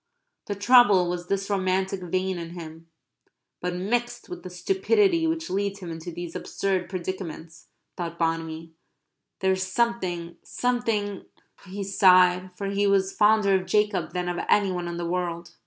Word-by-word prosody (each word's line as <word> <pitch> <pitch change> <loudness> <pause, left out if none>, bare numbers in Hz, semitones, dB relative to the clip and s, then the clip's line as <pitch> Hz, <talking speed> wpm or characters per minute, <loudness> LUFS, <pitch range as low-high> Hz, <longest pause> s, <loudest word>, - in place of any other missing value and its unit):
The 205 - -2
trouble 205 -4 +6
was 175 0 -5
this 195 +1 -1
romantic 190 -1 0
vein 185 +1 -1
in 170 +1 -7
him. 165 0 -10 0.7
"But 180 0 -2
mixed 240 +6 -2
with 360 - -7
the 185 - -8
stupidity 380 - +2
which 325 +1 -2
leads 200 +1 -1
him 180 -4 -7
into 165 +2 -7
these 175 0 -7
absurd 190 -3 -2
predicaments," 170 -3 -6 0.3
thought 170 -1 -5
Bonamy, 165 0 -2 0.7
"there 190 - +3
is 190 0 0
something 185 -4 -1
something" 225 -5 -1 0.4
he 200 +2 -5
sighed, 185 -2 +5
for 200 - -4
he 200 +1 +1
was 195 -1 +2
fonder 210 -2 +4
of 185 -1 +1
Jacob 210 0 +1
than 180 -1 -2
of 175 0 -2
any 200 -2 +4
one 175 -1 -3
in 170 0 -4
the 170 - -3
world. 170 -1 -3
185 Hz, 155 wpm, -25 LUFS, 175-205 Hz, 0.7 s, trouble